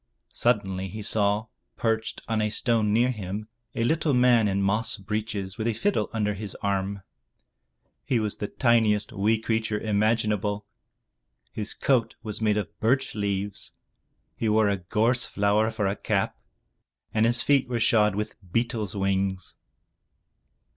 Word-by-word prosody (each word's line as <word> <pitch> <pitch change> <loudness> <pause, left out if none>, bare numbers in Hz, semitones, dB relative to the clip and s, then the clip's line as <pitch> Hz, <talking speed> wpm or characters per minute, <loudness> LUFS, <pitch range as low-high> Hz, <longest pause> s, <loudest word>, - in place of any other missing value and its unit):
Suddenly 95 -5 0
he 105 +3 -7
saw, 105 0 +2 0.3
perched 110 -1 -1
on 110 -1 0
a 105 - +1
stone 110 -1 +1
near 120 +4 +3
him, 105 -1 -5 0.3
a 115 - 0
little 155 +2 +1
man 125 -3 +5
in 100 0 0
moss 100 +5 +1
breeches 100 -1 -4
with 110 - -1
a 115 - +1
fiddle 200 - 0
under 105 -2 0
his 100 0 -6
arm. 100 0 -1 1.0
He 125 - +1
was 105 -2 -2
the 105 - -3
tiniest 115 -3 +2
wee 110 +2 +2
creature 110 -1 -1
imaginable. 105 -1 0 0.9
His 105 -1 -3
coat 125 -5 +1
was 105 0 -5
made 105 -1 +2
of 105 - -4
birch 130 +5 +1
leaves; 100 -1 -3 0.6
he 115 - -1
wore 110 -1 +4
a 100 - +1
gorse 110 +7 +1
flower 105 +2 +2
for 110 -2 -2
a 100 +1 0
cap, - - -1 0.8
and 110 +1 +3
his 120 +1 +3
feet 140 -3 +3
were 120 -1 -1
shod 105 -3 +3
with 105 +1 -3 0.2
beetles' 115 -2 -1
wings. 95 -1 -1
105 Hz, 145 wpm, -26 LUFS, 100-115 Hz, 1.0 s, man